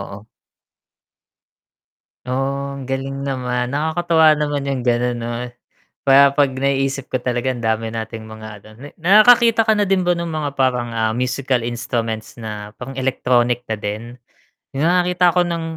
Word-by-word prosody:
oo. 105 Hz, -, -13 dB, 2.0 s
Oh, 140 Hz, +2 st, -2 dB
ang 135 Hz, -1 st, -8 dB
galing 135 Hz, +1 st, -3 dB
naman. 125 Hz, -2 st, -2 dB
Nakakatuwa 160 Hz, +2 st, +3 dB
naman 145 Hz, -2 st, -2 dB
'yung 135 Hz, -2 st, -2 dB
gano'n, 120 Hz, 0 st, +1 dB
'no? 120 Hz, +1 st, -4 dB, 0.8 s
Para 140 Hz, +1 st, +7 dB
'pag 140 Hz, 0 st, +3 dB
naiisip 135 Hz, 0 st, -1 dB
ko 130 Hz, -, 0 dB
talaga 125 Hz, +1 st, -1 dB
ang 120 Hz, -, -6 dB
dami 110 Hz, 0 st, -1 dB
nating 110 Hz, 0 st, -6 dB
mga 110 Hz, 0 st, -10 dB, 0.2 s
ano -, -, -15 dB
na 145 Hz, -, -9 dB
nakakakita 225 Hz, +5 st, +5 dB
ka 220 Hz, -, +4 dB
na 210 Hz, -, +2 dB
din 190 Hz, -2 st, +1 dB
ba 175 Hz, -, +3 dB
ng 170 Hz, -, -3 dB
mga 145 Hz, -3 st, -3 dB
parang, 125 Hz, -2 st, +1 dB
ah, 110 Hz, -1 st, +1 dB
musical 125 Hz, +2 st, -1 dB
instruments 115 Hz, -1 st, -4 dB
na 105 Hz, -2 st, -7 dB
pang 135 Hz, +2 st, -7 dB
electronic 125 Hz, -2 st, 0 dB
na 110 Hz, -, -1 dB
din? 110 Hz, +4 st, -6 dB, 0.6 s
'Yung 150 Hz, -, +1 dB
nakakita 180 Hz, 0 st, +3 dB
ako 180 Hz, -, +3 dB
ng 170 Hz, -1 st, -2 dB
135 Hz, 155 wpm, -19 LUFS, 120-150 Hz, 2.0 s, Para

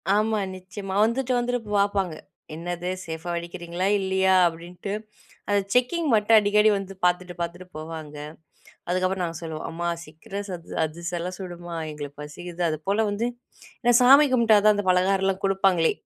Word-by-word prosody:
ஆமா, 215 Hz, 0 st, +2 dB, 0.2 s
நிச்சயமா. 190 Hz, +1 st, -7 dB
வந்துட்டு 255 Hz, +3 st, +1 dB
வந்துட்டு 245 Hz, 0 st, -1 dB, 0.2 s
பாப்பாங்க. 195 Hz, -5 st, +1 dB, 0.4 s
"என்னது 175 Hz, +2 st, -4 dB, 0.2 s
சேஃபா 160 Hz, +1 st, -6 dB
வெடிக்கிறீங்களா 175 Hz, +1 st, -3 dB
இல்லயா?" 190 Hz, 0 st, +2 dB
அப்டீன்ட்டு 175 Hz, +4 st, -6 dB, 0.6 s
அந்த 205 Hz, -, +4 dB
செக்கிங் 295 Hz, +7 st, +2 dB
மட்டும் 220 Hz, +1 st, +5 dB
அடிக்கடி 210 Hz, +1 st, +4 dB
வந்து 195 Hz, 0 st, -6 dB
பாத்துட்டு 180 Hz, 0 st, +1 dB
பாத்துட்டு 175 Hz, +2 st, -4 dB
போவாங்க. 155 Hz, -1 st, -7 dB, 0.7 s
அதுக்கப்புறம், 185 Hz, +1 st, 0 dB
நாங்க 165 Hz, -1 st, -4 dB
சொல்லுவோம், 160 Hz, -1 st, -5 dB
"அம்மா 170 Hz, +1 st, -3 dB, 0.2 s
சிக்கிரம் 195 Hz, +6 st, -7 dB
சத் 175 Hz, -3 st, -7 dB
அதிரசம்லாம் 170 Hz, +3 st, -4 dB
சுடுமா 175 Hz, -2 st, -7 dB
எங்களுக்கு 145 Hz, -1 st, -8 dB
பசிக்குது." 175 Hz, +3 st, -5 dB
அதுபோல 195 Hz, +8 st, 0 dB
வந்து 225 Hz, +4 st, -1 dB, 0.6 s
நான் 240 Hz, +1 st, +6 dB
சாமி 275 Hz, +4 st, +8 dB
கும்பிட்டா 225 Hz, -4 st, +5 dB
தான், 210 Hz, -, +7 dB
அந்த 205 Hz, -, -2 dB
பலகாரம்லாம் 190 Hz, +1 st, +2 dB
குடுப்பாங்களே. 190 Hz, -4 st, +3 dB
185 Hz, 140 wpm, -25 LUFS, 170-205 Hz, 0.7 s, சாமி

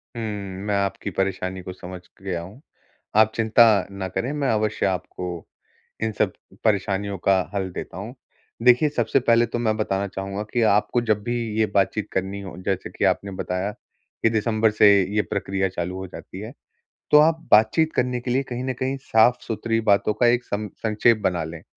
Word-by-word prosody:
हुँ, 115 Hz, -, -4 dB, 0.4 s
मैं 105 Hz, -1 st, 0 dB
आपकी 100 Hz, 0 st, -1 dB
परेशानी 95 Hz, -1 st, -2 dB
को 90 Hz, +1 st, -7 dB
समझ 90 Hz, 0 st, -9 dB, 0.2 s
गया 90 Hz, -3 st, -3 dB
हूँ, 100 Hz, +11 st, -12 dB, 0.5 s
आप 110 Hz, 0 st, +5 dB
चिंता 115 Hz, +1 st, +5 dB, 0.3 s
ना 100 Hz, -1 st, -4 dB
करें 120 Hz, +8 st, -3 dB
मैं 145 Hz, -3 st, -1 dB
अवश्य 110 Hz, -1 st, 0 dB
आपको 90 Hz, -2 st, -4 dB, 0.6 s
इन 110 Hz, -, 0 dB
सब -, -, +2 dB, 0.3 s
परेशानियों 100 Hz, -1 st, 0 dB
का 95 Hz, -1 st, +5 dB, 0.2 s
हल 95 Hz, -1 st, -1 dB
देता 90 Hz, -, -7 dB
हूँ। 110 Hz, +6 st, -7 dB, 0.5 s
देखिये 125 Hz, +5 st, +5 dB
सबसे 120 Hz, +3 st, +2 dB
पहले 120 Hz, -1 st, +4 dB
तो 120 Hz, +1 st, -4 dB
मैं 110 Hz, -2 st, +1 dB
बताना 100 Hz, -2 st, -1 dB
चाहूँगा 100 Hz, +1 st, -5 dB
कि 120 Hz, -, +2 dB
आपको 110 Hz, +3 st, +2 dB
जब 110 Hz, -3 st, 0 dB
भी 120 Hz, 0 st, -2 dB, 0.2 s
ये 110 Hz, -, +4 dB
बातचीत 100 Hz, +1 st, +1 dB
करनी 95 Hz, +1 st, -2 dB
हो 95 Hz, -, -8 dB
जैसे 95 Hz, -3 st, -2 dB
कि 95 Hz, +2 st, -1 dB
आपने 95 Hz, +1 st, 0 dB
बताया, 95 Hz, +2 st, -3 dB
कि 115 Hz, +2 st, -5 dB
दिसंबर 110 Hz, 0 st, +1 dB
से 105 Hz, 0 st, +5 dB, 0.3 s
ये 105 Hz, -, +4 dB
प्रक्रिया 95 Hz, -2 st, -2 dB
चालू 90 Hz, 0 st, -4 dB
हो 95 Hz, -, -6 dB
जाती 95 Hz, +1 st, -10 dB
है, 110 Hz, +5 st, -8 dB, 0.6 s
तो 150 Hz, -, +8 dB
आप 160 Hz, +1 st, +4 dB
बातचीत 110 Hz, +10 st, +5 dB
करने 125 Hz, -1 st, 0 dB
के 120 Hz, +1 st, -5 dB
लिए 130 Hz, +3 st, +2 dB
कहीं 125 Hz, -1 st, -5 dB
न 130 Hz, -, -1 dB
कहीं 130 Hz, +2 st, -2 dB
साफ-सुथरी 115 Hz, -1 st, +2 dB
बातों 105 Hz, 0 st, +3 dB
का 120 Hz, +3 st, +2 dB
एक 120 Hz, +1 st, +3 dB
सं 105 Hz, +1 st, -3 dB
संक्षेप 110 Hz, +1 st, +3 dB
बना 85 Hz, -3 st, +1 dB
लें। 80 Hz, 0 st, -8 dB
105 Hz, 185 wpm, -23 LUFS, 95-120 Hz, 0.6 s, तो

